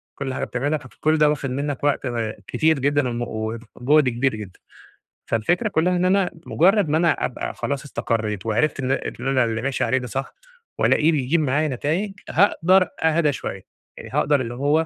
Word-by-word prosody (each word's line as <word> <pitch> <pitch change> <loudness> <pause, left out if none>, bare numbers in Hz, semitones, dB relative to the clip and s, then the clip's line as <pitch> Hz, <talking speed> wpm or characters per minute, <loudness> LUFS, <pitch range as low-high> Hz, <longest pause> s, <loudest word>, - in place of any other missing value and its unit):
كل 135 -1 -4
حاجة - - -3
بتعملها، 145 +5 -1
فك 130 - -13
كل 155 +1 +2
ده 150 -1 +5
واخد 140 -2 -2
منك 140 +1 -3
وقت 145 -1 +1
آآ 115 -3 -2
كتير 160 -2 +2
جدًا 145 -1 +1
ومُ 120 0 -3 0.5
وجُهد 140 +2 +3
كبير 120 0 0
جدًا. 100 -4 -9 0.7
فالفكرة 175 - +1
كلها 180 0 +1
إن 180 +1 +1
أنا 185 -1 +2
مجرد 195 +1 +3
ما 155 - +2
أنا 170 0 +3
أبقى 125 - -4
خلاص 140 0 -3
إستقريت 110 -7 -2
وعرفت 125 +7 0
إن 130 0 -1
إن 135 - -3
أنا 130 -2 +3
اللي 110 -1 -2
ماشي 135 0 -1
عليه 130 - +2
ده 125 -1 -4
صح 135 +4 -4 0.5
وألاقيه 155 +2 +4
بيجيب 145 +2 +1
معايا 150 +2 +1
نتايج، 155 - -2 0.2
هاقدر 185 -1 +3
أهدى 160 -2 +3
شوية، 95 -7 -6 0.4
آآ، - - -9
هاقدر 145 -2 +2
اللي 120 -1 -4
هُو 145 +5 +2
145 Hz, 185 wpm, -22 LUFS, 125-160 Hz, 0.7 s, ده